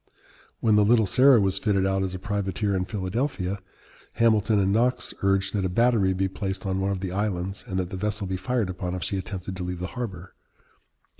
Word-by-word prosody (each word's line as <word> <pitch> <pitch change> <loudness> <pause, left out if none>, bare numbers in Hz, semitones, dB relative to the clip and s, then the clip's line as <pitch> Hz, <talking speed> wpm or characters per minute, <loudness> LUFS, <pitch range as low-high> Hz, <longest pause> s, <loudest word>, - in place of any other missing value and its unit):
When 110 -2 +4
the 105 - +5
Little 110 +1 +4
Sarah 130 +6 +6
was 95 -2 +1
fitted 100 -3 +1
out 95 0 +1
as 95 -1 -2
a - - -3
privateer 100 +1 -1
in 90 -1 0
Philadelphia, 100 0 -2 0.5
Hamilton 110 -2 +3
and 95 -1 +2
Knox 125 +4 +1
urged 95 0 +1
that 100 -2 0
a 95 - 0
battery 110 -1 +3
be 95 +1 0
placed 95 0 -4
on 95 -1 -1
one 95 +1 0
of 95 -2 -2
the 95 -2 -3
islands 95 -1 -2
and 95 - -3
that 90 -1 -2
the 95 - -4
vessel 105 +1 -2
be 95 0 -2
fired 100 +1 -1
upon 90 0 -4
if 90 - -4
she 95 - -1
attempted 95 -1 -6
to 90 - -4
leave 90 0 -4
the 90 - -4
harbor. 95 -8 -6
95 Hz, 215 wpm, -26 LUFS, 95-105 Hz, 0.5 s, Sarah